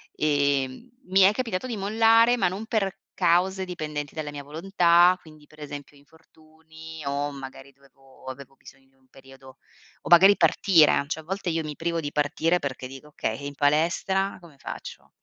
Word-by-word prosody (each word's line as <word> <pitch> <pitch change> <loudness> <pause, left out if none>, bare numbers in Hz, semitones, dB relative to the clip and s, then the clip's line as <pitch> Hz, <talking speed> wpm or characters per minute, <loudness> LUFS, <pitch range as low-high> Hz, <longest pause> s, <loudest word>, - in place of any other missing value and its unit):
ehm, 145 - 0 0.2
mi 190 +2 +3
è 190 +1 +7
capitato 225 -2 -3
di 240 -4 -4
mollare, 225 +4 +4
ma 205 - +1
non 195 +5 -6
per 210 -4 -2
cause 190 +3 +1
dipendenti 150 -5 -6
dalla 155 -2 -5
mia 145 -1 -8
volontà. 175 +3 +3
Quindi, 155 -2 -17
per 155 - -20
esempio 145 0 -9
infortuni 160 +1 -15
o 140 +1 -2
magari 135 0 -10
dovevo 135 -1 -23
avevo 135 +1 -10
bisogno 135 0 -18
di 135 - -36
un 130 0 -32
periodo 135 0 -16 0.4
o - - -8
magari 190 +4 +7
partire, 160 -9 +4
cioè, 160 +1 -4
a - - -20
volte 190 +2 -4
io 165 -1 -1
mi 150 -1 -6
privo 170 0 -2
di 145 -2 -5
partire 160 +4 0
perché 135 -3 -5
dico: 135 +3 -12
"Okay 115 -6 -4
e 140 - -8
in 145 0 -7
palestra 170 +7 0
come 165 -5 -17
faccio?" - - -9
155 Hz, 175 wpm, -25 LUFS, 140-185 Hz, 0.4 s, è